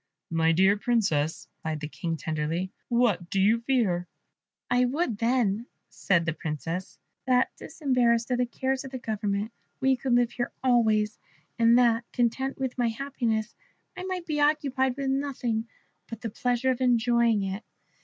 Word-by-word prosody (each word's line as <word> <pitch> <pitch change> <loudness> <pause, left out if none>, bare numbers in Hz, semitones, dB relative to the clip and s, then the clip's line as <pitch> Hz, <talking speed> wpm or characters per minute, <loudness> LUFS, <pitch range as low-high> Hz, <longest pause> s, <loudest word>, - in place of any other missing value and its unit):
"My 165 0 +3
dear 190 +5 +4
Princess," 175 -8 0
replied 155 -1 -3
the 150 - -4
King, 165 +2 -4
tenderly, 160 +5 -2 0.2
"what 220 -8 +1
do 195 - 0
you 215 +4 +4
fear?" 220 -9 +1 0.6
"I 245 +1 +3
would, 250 - -1
then," 230 -2 +1 0.2
said 170 -4 +1
the 160 - 0
Princess, 165 +3 -5 0.3
"that, 250 -1 +3
disembarrassed 245 -4 +1
of 250 - +1
the 250 - +2
cares 265 +2 -2
of 265 -1 -6
government, 210 0 -2 0.3
we 265 0 +3
could 255 0 -1
live 240 -1 +3
here 240 - -3
always, 220 -4 +2 0.4
and 230 +1 +6
that, 235 -2 +4
content 250 +2 0
with 260 -1 -3
my 240 - +3
happiness, 230 -3 -2 0.4
I 365 - -6
might 370 -2 -3
be 300 -3 -1
occupied 275 -3 +1
with 275 -1 -1
nothing 250 -5 -1 0.4
but 230 -1 -8
the 230 - -4
pleasure 250 +2 +1
of 255 0 -3
enjoying 235 -3 +3
it. 195 +3 -4
235 Hz, 155 wpm, -27 LUFS, 200-255 Hz, 0.6 s, and